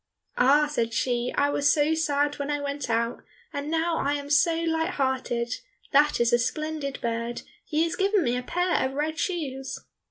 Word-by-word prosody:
"Ah," 280 +4 +5
said 235 -6 -2
she, 245 -1 0
"I 285 0 +3
was 285 0 +3
so 300 +1 +3
sad 290 -2 0
when 285 0 -3
I 290 0 0
went 285 -2 -4
out 230 +1 0 0.3
and 285 +1 -4
now 325 +1 +1
I 285 +1 0
am 285 0 -4
so 310 +3 +4
light 325 +1 0
hearted; 255 -3 -1 0.4
that 295 +1 +4
is 235 0 +2
a 240 - +5
splendid 305 +1 -2
bird, 235 0 -3 0.2
he 315 0 0
has 330 - -1
given 395 -1 +2
me 245 -2 +1
a 250 - -1
pair 355 +7 0
of 260 - -1
red 310 +3 -2
shoes!" 270 -7 -3
285 Hz, 190 wpm, -26 LUFS, 250-315 Hz, 0.4 s, Ah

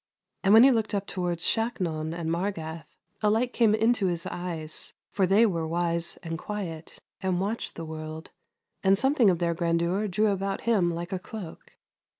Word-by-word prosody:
And 195 - +4
when 225 - +9
he 270 - +8
looked 220 -3 0
up 200 0 -1
towards 175 -3 -3
Shaknon 175 -9 -1
and 165 -1 -3
Margath, 165 -4 -3 0.3
a 210 - +3
light 240 +4 +1
came 220 -3 +4
in 225 +2 +3
his 180 -7 -1
eyes, 165 -3 -5 0.2
for 190 -2 +2
they 205 +5 +5
were 165 -6 -1
wise 170 0 0
and 165 -1 -4
quiet, 175 -6 -6 0.2
and 185 -2 0
watched 205 +4 -2
the 165 - -6
world, 155 +1 -7 0.5
and 195 0 +5
something 265 -2 +4
of 180 - +2
their 170 0 0
grandeur 170 +4 0
drew 210 +3 +2
about 195 0 -2
him 205 -7 +2
like 170 +3 -5
a 185 - -1
cloak. 190 -4 -9
180 Hz, 175 wpm, -27 LUFS, 165-210 Hz, 0.5 s, when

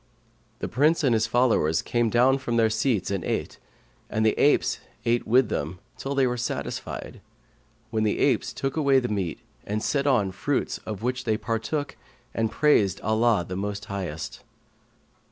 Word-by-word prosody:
The - - -4
Prince 150 +7 +2
and 130 -4 +4
his 110 0 +2
followers 110 -11 +2
came 120 -1 +1
down 125 +4 +4
from 120 -3 -2
their 110 -1 +3
seats 110 -3 0
and 95 -4 -2
ate, - - -3 0.5
and 110 0 0
the 110 - +4
apes 145 - +3 0.3
ate 120 +1 +1
with 125 +1 +4
them, 80 +5 -3 0.2
till 140 +1 -4
they 135 -1 +4
were 125 -1 -1
satisfied, 120 - -4 0.7
when 110 -1 0
the 105 - +1
apes - - +2
took 135 -1 -3
away 140 -4 +4
the 125 -2 +1
meat 95 -6 -2 0.2
and 105 +1 -3
set 140 -1 0
on 110 -8 +3
fruits 140 +8 -1
of 110 -1 -5
which 125 +1 -2
they 110 -2 +1
partook 115 +7 -3 0.4
and 115 -1 0
praised 105 - +3
Allah 110 -3 +2
the 90 - -4
most 100 +2 -4
Highest. 80 -6 -5
115 Hz, 170 wpm, -26 LUFS, 105-130 Hz, 0.7 s, and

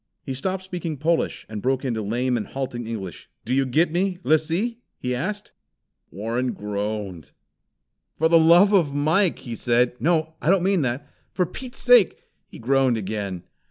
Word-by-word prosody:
He 135 - -4
stopped 185 +8 -3
speaking 175 -4 -5
Polish, 165 +4 0
and 110 -2 -6
broke 130 +3 0
into 115 -4 -1
lame 120 +5 0
and 110 - -3
halting 125 -4 -5
English. 100 -7 -6 0.2
"Do 125 - -1
you 135 0 +2
get 155 +6 +2
me, 180 +2 0
Lissee!" 165 +10 +1 0.2
he 125 0 -3
asked. 205 +12 -4 0.6
Warren 115 +6 -2
groaned. 100 -6 -5 0.8
"For 160 - +3
the 165 0 +6
love 175 +6 +6
of 160 -8 +3
Mike!" 160 +6 +2
he 120 - -7
said. 120 +1 +2
"No, 160 -1 +1
I - - 0
don't 190 -1 +4
mean 190 -2 +2
that! 135 +2 -2 0.3
For 180 - +1
Pete's 245 +8 -7
sake 245 -6 +6 0.2
" - - -49
He - - -10
groaned 130 0 +2
again. 100 -3 -4
135 Hz, 170 wpm, -23 LUFS, 115-175 Hz, 0.8 s, the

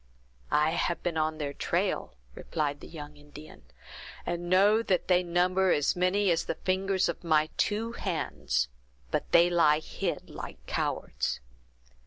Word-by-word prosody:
"I 150 +1 +3
have 170 0 -1
been 175 -2 -1
on 155 0 0
their 145 -2 -3
trail," - - -1 0.2
replied 145 - -3
the - - -11
young 150 -2 -9
Indian, 145 +1 -13 0.6
"and 175 0 -3
know 200 +4 +5
that 190 -5 0
they 180 -1 +4
number 180 +2 +2
as 145 - +2
many 185 +2 +2
as 165 0 +1
the - - -2
fingers 190 0 0
of - - -4
my 155 -2 +3
two 220 +2 0
hands; 170 - -1 0.4
but - - -2
they 170 +1 +7
lie 165 -4 +4
hid 155 - -4
like - - -9
cowards." - - -2
175 Hz, 150 wpm, -29 LUFS, 155-185 Hz, 0.6 s, they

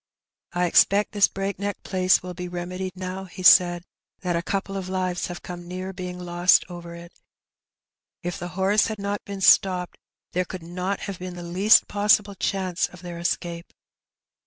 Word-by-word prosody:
*' - - -68
I 175 0 +1
expect 200 +4 +4
this 205 -1 +4
breakneck 195 0 -4
place 185 -1 +2
will 180 0 -6
be 180 0 -6
remedied 180 +1 -5
now/^ 185 +1 -6
he 185 +2 -9
said, 175 0 +6 0.4
"that 180 -2 -1
a 170 - 0
couple 195 +2 -3
of 190 -1 -4
lives 185 -1 -1
have 175 -1 -8
come 175 -1 -8
near 185 +2 -5
being 180 -1 -6
lost 175 0 +3
over 170 -1 -8
it. 170 0 -11 1.1
If 175 0 -4
the 175 - -5
horse 200 +2 +3
had 220 - -4
not 200 0 -3
been 200 -1 -7
stopped 180 -2 +4 0.3
there 180 - 0
could 180 -1 -8
not 180 +3 -3
have 200 -3 -6
been 180 0 -6
the 175 - -8
least 185 +5 +4
possible 205 0 +3
chance 185 -2 -1
of 180 0 -15
their 175 -1 -7
escape. 170 -1 -3
185 Hz, 180 wpm, -24 LUFS, 175-195 Hz, 1.1 s, said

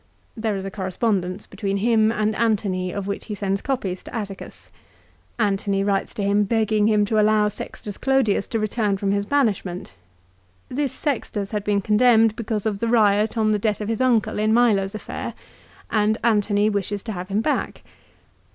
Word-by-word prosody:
There 220 -2 -1
is 190 - -5
a 195 - -5
correspondence 190 -1 -2
between 200 -1 -3
him 220 +1 +3
and 215 -1 0
Antony 200 -5 0
of 200 0 -4
which 200 0 -4
he 210 - -5
sends 195 0 -1
copies 200 -9 -2
to - - -10
Atticus. 200 -4 -7 0.7
Antony 200 -2 0
writes 195 -1 -1
to 205 - -2
him 200 +1 +3
begging 215 0 +1
him 210 -1 +3
to 215 +1 +1
allow 210 0 +3
Sextus 205 0 -8
Clodius 265 -7 +2
to 225 - -2
return 215 -2 0
from 195 0 -1
his 200 0 0
banishment. 205 -10 -1 0.8
This 275 0 -1
Sextus 220 -8 -3
had 210 -2 -2
been 205 -1 +1
condemned 220 +1 +4
because 220 -2 -3
of 210 -2 -1
the 230 - -1
riot 215 -1 +3
on 215 -1 +2
the 210 -1 +2
death 210 0 0
of 210 0 -4
his 225 +2 -1
uncle 240 -5 +2
in 215 +1 +2
Milo's 210 -5 +2
affair, 215 - -6 0.6
and 215 0 +2
Antony 210 -2 +2
wishes 205 -1 -2
to 225 - -5
have 180 -2 -5
him 200 +2 0
back. 295 - -2
210 Hz, 180 wpm, -23 LUFS, 200-225 Hz, 0.8 s, condemned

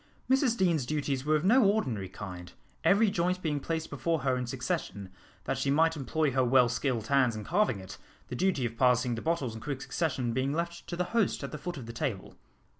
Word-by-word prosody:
Mrs 260 -3 +3
Deane's 170 -9 +1
duties 145 -3 -1
were 155 +1 +3
of 155 - 0
no 245 +6 +6
ordinary 130 - +1
kind, 90 -2 -8 0.3
every 205 +1 +4
joint 180 0 0
being 150 -3 0
placed 160 +2 -3
before 150 +3 -1
her 130 -1 +1
in 125 -1 -3
succession, 120 -6 -3 0.3
that - - -2
she - - 0
might 160 +3 +3
employ 150 +1 0
her 130 0 +2
well 125 0 +5
skilled 125 -2 -1
hands 130 -2 +3
in 110 - -5
carving 175 - +1
it, 95 -1 -10 0.3
the 125 - -5
duty 175 -4 +1
of 115 0 -4
passing 125 -1 +3
the 115 - -4
bottles 160 -8 -1
in 110 - -8
quick 140 -3 -4
succession 135 -8 -1
being 130 +3 0
left 170 +1 -3
to 175 - -4
the 180 - 0
host 225 -10 +1
at 140 - -5
the 150 - -5
foot 175 0 -5
of 130 - -7
the 115 - -8
table. 115 -6 -3
140 Hz, 220 wpm, -29 LUFS, 120-170 Hz, 0.3 s, no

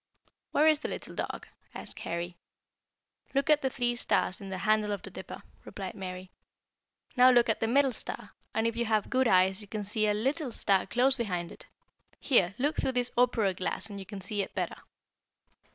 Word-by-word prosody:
"Where 305 +2 +4
is 310 -2 +5
the - - -4
little - - -6
dog?" - - -4 0.3
asked - - -7
Harry. 170 +1 -4 1.0
"Look 280 +3 +3
at 300 0 +5
the 265 - 0
three 240 -2 0
stars 195 -5 0
in 195 - -7
the 190 - -4
handle 215 +2 +2
of 200 - -5
the - - -9
Dipper," - - -9 0.2
replied 190 -2 -6
Mary. 185 -1 -7 0.8
"Now 250 +1 +7
look 240 -2 +5
at 220 - +1
the 225 - 0
middle 270 +2 +3
star, - - -6 0.2
and 220 - 0
if 230 0 0
you 235 0 0
have 215 -2 0
good 260 -1 +3
eyes 190 0 +4
you 205 - -9
can 210 +1 -4
see 215 +2 +1
a 210 - +2
little 270 +5 -1
star 195 -4 +1
close 250 +6 +3
beside 180 -7 -2
it. - - -13 0.5
Here, 195 -9 +3
look 290 +4 0
through 260 - 0
this 245 0 0
opera 235 -5 +3
glass 185 +4 -2
and 200 - -6
you 190 - -9
can 200 -1 -7
see 200 +2 -1
it 195 - -6
better." - - -3
220 Hz, 200 wpm, -29 LUFS, 195-250 Hz, 1.0 s, Now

